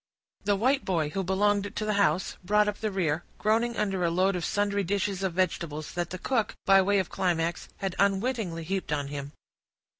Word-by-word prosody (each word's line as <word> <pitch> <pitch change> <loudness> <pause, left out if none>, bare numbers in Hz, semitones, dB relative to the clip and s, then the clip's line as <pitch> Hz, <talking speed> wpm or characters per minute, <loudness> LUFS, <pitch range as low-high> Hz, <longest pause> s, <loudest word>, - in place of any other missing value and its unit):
The 205 - +3
white 260 +7 +2
boy, 160 -5 0
who 195 +2 -2
belonged 205 +2 +1
to 215 - -2
the 215 - +1
house, 190 -3 +1
brought 210 +3 +3
up 210 - -2
the 215 - -1
rear, 170 -5 0
groaning 230 +2 +1
under 195 -3 0
a 170 - +3
load 185 +3 +2
of 175 - -3
sundry 205 +2 0
dishes 195 +1 -1
of 190 -3 -1
vegetables, 165 -4 -1
that 175 -1 -2
the 185 - -5
cook, 230 +3 -1
by 195 0 +7
way 200 +2 +2
of 190 -3 0
climax, 170 -2 -1
had 195 -2 -3
unwittingly 200 -3 0
heaped 190 +2 -3
on 145 -2 -1
him. 140 0 -6
195 Hz, 200 wpm, -28 LUFS, 170-205 Hz, -, by